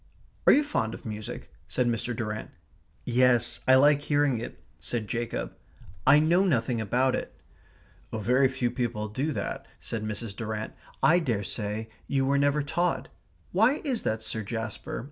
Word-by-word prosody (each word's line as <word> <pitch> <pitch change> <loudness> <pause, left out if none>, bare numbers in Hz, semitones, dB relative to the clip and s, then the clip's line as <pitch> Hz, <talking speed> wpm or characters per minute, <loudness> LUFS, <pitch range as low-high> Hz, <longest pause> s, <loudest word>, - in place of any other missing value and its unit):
"Are - - +10
you 295 - +5
fond 115 - -1
of - - -13
music?" 105 -1 -6 0.2
said 125 - 0
Mr. 120 0 -1
Durrant. 105 -1 -4 0.6
"Yes. 125 -1 +3
I 130 - +8
like 145 +2 +5
hearing 145 -4 +2
it," 115 - -7 0.2
said 115 -3 -3
Jacob. 115 +1 -3 0.5
"I 145 - +8
know 170 +5 +4
nothing 120 -9 +1
about 125 +5 +2
it." - - -4 0.7
"Very 125 +5 +3
few 130 -2 -1
people 115 -4 -2
do 135 +9 -1
that," - - -4
said 110 -2 -4
Mrs. 110 -1 -4
Durrant. 110 -1 -4 0.3
"I 160 +6 +6
daresay 105 - -2 0.2
you 135 -1 +1
were 140 +1 +2
never 145 +1 +2
taught. 145 -2 -1 0.4
Why 225 +9 +4
is 260 -7 -1
that, 110 0 -1
Sir 110 - -3
Jasper? 110 +1 -4
120 Hz, 155 wpm, -28 LUFS, 110-140 Hz, 0.7 s, Are